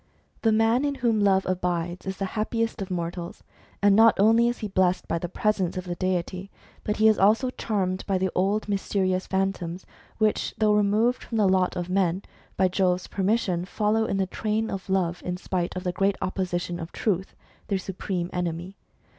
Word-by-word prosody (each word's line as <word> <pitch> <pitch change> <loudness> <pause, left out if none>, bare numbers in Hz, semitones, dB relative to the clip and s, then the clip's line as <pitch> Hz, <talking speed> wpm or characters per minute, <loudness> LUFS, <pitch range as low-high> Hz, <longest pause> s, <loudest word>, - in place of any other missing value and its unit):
The 225 - +3
man 225 +4 +3
in 285 -1 0
whom 235 -4 +1
Love 195 -2 +3
abides 175 -1 -2
is 190 0 -3
the 195 - -2
happiest 225 0 -1
of 195 - -4
mortals. 170 -1 -4 0.4
And 200 -1 +6
not 225 -1 +6
only 225 +3 +5
is 240 - -1
he 215 - -4
blessed 185 -2 +1
by 170 - -1
the 175 - -4
presence 190 -2 0
of 185 - -3
the 175 -1 -4
deity, 185 +1 -2 0.3
but 210 - -1
he 220 - +5
is 220 - +4
also 225 +6 +3
charmed 190 -6 -2
by 195 -2 +1
the 185 0 0
old 200 +4 0
mysterious 190 -2 0
Phantoms, 190 -2 -2 0.3
which, 215 -1 0
though 215 -1 +3
removed 210 +4 +2
from 230 - -4
the 210 -2 +4
lot 185 -1 +2
of 175 -1 -3
men, 185 0 +1 0.3
by 190 - +4
Jove's 180 -1 +1
permission 195 -3 0
follow 215 +4 0
in 195 - -1
the 195 - +1
train 215 +3 -2
of 195 0 -6
Love, 180 -2 0
in 180 0 -3
spite 180 -1 -3
of 185 - -4
the 180 - 0
great 195 +2 +1
opposition 175 -2 -2
of 165 0 -7
Truth, 190 -3 -2 0.3
their 200 - 0
supreme 185 -1 -4
enemy. 175 +2 -3
190 Hz, 190 wpm, -26 LUFS, 180-215 Hz, 0.4 s, And